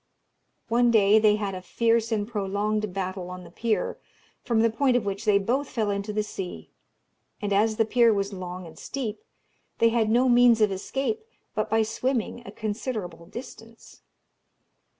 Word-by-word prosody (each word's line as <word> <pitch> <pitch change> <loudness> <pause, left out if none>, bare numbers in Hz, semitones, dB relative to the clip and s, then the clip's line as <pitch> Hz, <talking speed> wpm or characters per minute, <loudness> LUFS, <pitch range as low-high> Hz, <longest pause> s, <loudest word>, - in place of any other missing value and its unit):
One 240 +1 +3
day 215 -2 +5
they 210 -1 +5
had 205 -2 -3
a 185 - -6
fierce 230 +4 +1
and 210 -2 0
prolonged 210 -1 -1
battle 185 -1 -4
on 180 0 -8
the 170 - -13
pier, 225 +4 -1 0.4
from 230 -2 +2
the 230 0 +3
point 255 +1 +2
of 225 - -2
which 200 +2 -3
they 210 -2 +5
both 250 +8 0
fell 215 -3 -1
into 200 +1 -3
the 210 0 0
sea; 195 -3 -7 0.7
and 205 -1 -1
as 215 +2 +3
the 225 - +2
pier 235 +1 +4
was 200 -1 -1
long 185 -1 -6
and 160 -1 -12
steep, 225 -6 -4 0.6
they 230 - +4
had 225 -2 +1
no 245 +3 +4
means 240 -2 +6
of 210 -2 +3
escape 270 - -2 0.3
but 215 - -1
by 225 +1 +3
swimming 240 +2 -2
a - - -7
considerable 205 -6 -4
distance. 230 +1 -11
215 Hz, 170 wpm, -26 LUFS, 200-230 Hz, 0.7 s, means